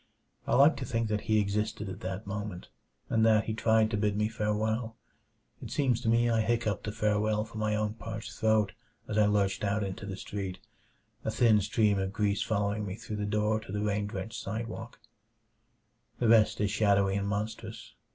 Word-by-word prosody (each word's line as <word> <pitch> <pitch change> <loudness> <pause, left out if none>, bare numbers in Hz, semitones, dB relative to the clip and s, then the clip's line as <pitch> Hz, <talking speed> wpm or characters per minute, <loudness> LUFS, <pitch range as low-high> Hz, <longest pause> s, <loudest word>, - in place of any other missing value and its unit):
I - - +2
like 140 +4 +6
to 140 - -4
think 115 -2 -1
that 105 -1 0
he 110 0 +4
existed 105 +1 -1
at 95 0 -6
that 95 +3 -5
moment, 100 -2 -5 0.4
and 110 - +2
that 110 -1 +5
he 110 - -3
tried 110 0 +3
to 105 - 0
bid 105 0 0
me 105 0 +1
farewell. 110 +1 -1 0.7
It - - -7
seems 125 -5 +1
to 115 - 0
me 115 +1 +4
I 115 -1 +2
hiccupped 110 -3 -1
a - - -1
farewell 105 0 +1
from 110 0 -8
my 105 0 +1
own 105 0 -1
parched 110 -1 -7
throat 110 -3 +2 0.4
as 110 - 0
I 105 - +5
lurched 100 -1 +1
out 105 +1 +1
into 100 0 -5
the 95 -1 -5
street; 95 -2 -5 0.7
a - - -1
thin 110 -4 +4
stream 105 0 +2
of 95 0 -2
grease 105 -1 0
following 105 -1 0
me 95 -2 -4
through 105 0 -6
the 105 - -2
door 105 +1 +1
to 110 - -10
the 105 +1 -2
rain 105 0 0
drenched 110 +1 -5
sidewalk. 115 +1 -5 1.2
The 120 - +1
rest 110 -1 +5
is 105 -2 +1
shadowy 100 -2 +3
and 100 0 -1
monstrous. 105 +2 -4
105 Hz, 195 wpm, -30 LUFS, 100-110 Hz, 1.2 s, like